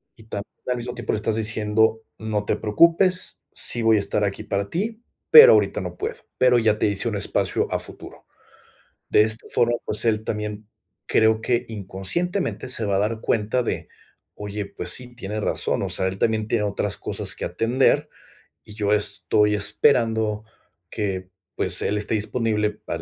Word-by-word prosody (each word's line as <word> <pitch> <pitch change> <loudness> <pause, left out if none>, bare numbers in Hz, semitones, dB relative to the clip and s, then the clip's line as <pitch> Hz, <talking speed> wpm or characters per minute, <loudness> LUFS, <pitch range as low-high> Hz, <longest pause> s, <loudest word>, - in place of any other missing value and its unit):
y 110 - -17
también 105 -2 -6 0.2
al 125 -1 0
mismo 120 +1 -5
tiempo 120 -3 -3
le - - 0
estás 110 +1 -1
diciendo: 110 0 +1 0.2
"No 105 -2 -3
te - - +1
preocupes, 170 - +2
sí 120 - -2
voy 110 -1 +5
a - - +3
estar 100 +1 -1
aquí 100 -1 -2
para 100 0 -2
ti, 220 - -3 0.3
pero 470 +1 +11
ahorita - - +2
no - - -6
puedo, 450 +4 -4 0.2
pero 125 -1 +5
ya 110 -2 +2
te - - +1
hice 100 +3 0
un 110 - -1
espacio 100 - -1
a - - +1
futuro", - - -10 0.8
de - - +5
esta 110 +1 -2
forma, 120 0 +2
pues, 105 +2 -2
él 110 -2 +1
también 105 0 -4 0.4
creo 110 0 +3
que 120 +1 0
inconscientemente 115 - -3
se 125 -3 -2
va 100 - +1
a - - +2
dar 110 +2 -1
cuenta 110 +3 0
de: - - -4 0.5
"Oye, 105 0 -5
pues 90 -3 -6
sí, 125 +5 -4
tiene 105 -1 -4
razón, - - 0
o - - -2
sea, 95 - 0
él 95 +1 -6
también 110 0 +1
tiene 105 - +1
otras 100 0 -2
cosas - - -2
que - - -5
atender, 130 +5 +1 0.6
y 105 - -11
yo 105 -2 0
estoy 105 +1 +2
esperando 110 0 +1 0.5
que, 95 -3 -3 0.3
pues, - - 0
él 105 - 0
esté 105 +2 0
disponible 110 0 0
para". 95 -5 -6
110 Hz, 180 wpm, -23 LUFS, 105-120 Hz, 0.8 s, pero